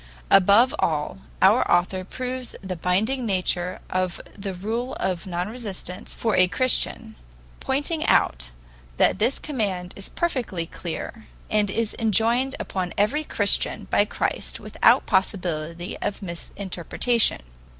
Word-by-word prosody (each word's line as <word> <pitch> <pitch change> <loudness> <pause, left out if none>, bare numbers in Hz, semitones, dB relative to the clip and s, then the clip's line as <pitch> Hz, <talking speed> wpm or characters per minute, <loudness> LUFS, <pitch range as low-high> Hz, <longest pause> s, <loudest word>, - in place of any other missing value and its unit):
Above 205 +6 +6
all, 150 - -1 0.2
our - - +6
author 185 +2 +2
proves 255 +4 -4
the 185 -1 -4
binding 205 +10 0
nature 185 -3 -1
of 185 -1 -1 0.2
the 195 -2 -5
rule 225 +7 -3
of 185 -1 -2
non 175 0 -2
resistance 210 -4 -6
for 225 -2 0
a 185 - +5
Christian, 255 +7 +1 0.4
pointing 295 +4 0
out - - +2 0.5
that - - +3
this 240 +6 +2
command 195 -11 -3
is 195 - -8
perfectly 240 - -2
clear, 180 +7 -7 0.2
and 210 -1 +2
is 225 +2 -1
enjoined 230 +5 +2
upon 185 -2 -3
every 275 +10 +2
Christian - - +2
by - - +5
Christ - - -3
without - - +3
possibility 175 -2 -1
of 205 0 -3
misinterpretation. 190 - 0
195 Hz, 125 wpm, -24 LUFS, 180-235 Hz, 0.5 s, Above